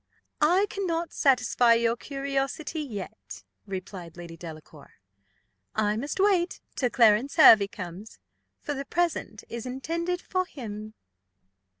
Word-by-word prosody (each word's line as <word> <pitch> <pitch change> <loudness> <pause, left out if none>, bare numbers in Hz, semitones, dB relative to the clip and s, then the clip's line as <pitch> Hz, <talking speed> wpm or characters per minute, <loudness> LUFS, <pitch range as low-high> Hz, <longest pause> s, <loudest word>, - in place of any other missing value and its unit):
"I 355 +7 +4
cannot 340 -5 -2
satisfy 250 -3 +4
your 230 0 +2
curiosity 275 +4 -3
yet," 220 -6 -8 0.2
replied 185 -3 -7
Lady 170 -1 -8
Delacour. 155 -3 -11 0.8
"I 210 -1 +1
must 280 - -4
wait 380 -3 +2 0.2
till 250 - +1
Clarence 235 +3 +4
Hervey 220 -11 +8
comes, 185 +2 -9 0.4
for 295 - -4
the 275 0 -5
present 335 -9 -1
is 235 +1 -6
intended 335 +7 -2
for 370 0 -2
him." 215 - -8
250 Hz, 115 wpm, -27 LUFS, 210-315 Hz, 0.8 s, Hervey